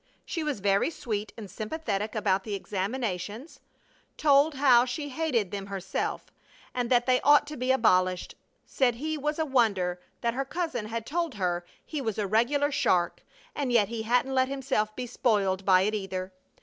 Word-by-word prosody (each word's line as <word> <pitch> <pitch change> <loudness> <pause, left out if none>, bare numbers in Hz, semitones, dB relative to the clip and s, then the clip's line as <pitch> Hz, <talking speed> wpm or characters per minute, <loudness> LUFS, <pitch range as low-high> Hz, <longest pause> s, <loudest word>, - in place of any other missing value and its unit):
She 330 - -3
was 290 -9 -2
very 200 +6 +2
sweet 215 -9 -4
and 215 -3 -7
sympathetic 215 - -3
about 195 -3 +1
the 210 -1 -3
examinations, 205 - -4 0.6
told 290 0 +4
how 260 -3 +6
she 270 +4 -4
hated 255 - -1
them 195 -1 -5
herself 190 -1 -4 0.4
and 245 -1 -1
thought 245 -1 +3
they 255 -1 +3
ought 290 0 +6
to 300 +1 -7
be 255 0 0
abolished; 185 -8 +2 0.3
said 250 -3 +1
he 310 +6 -3
was 300 +1 -2
a 320 - 0
wonder, 200 -10 +1 0.2
that 235 -1 0
her 270 +3 -1
cousin 275 -7 -3
had 225 0 -4
told 330 -2 -2
her 180 -3 -1 0.2
he 300 -3 -4
was 220 -5 -2
a 210 - 0
regular 250 +8 +2
shark, 175 -9 +1 0.3
and 275 -4 -2
yet 215 -4 +3
he 230 -1 -3
hadn't 245 +4 +1
let 260 0 +3
himself 265 -6 -1
be 250 - -4
spoiled 200 -6 0
by 185 -1 +6
it, 210 +2 0
either. 190 -2 -4
235 Hz, 175 wpm, -28 LUFS, 200-275 Hz, 0.6 s, how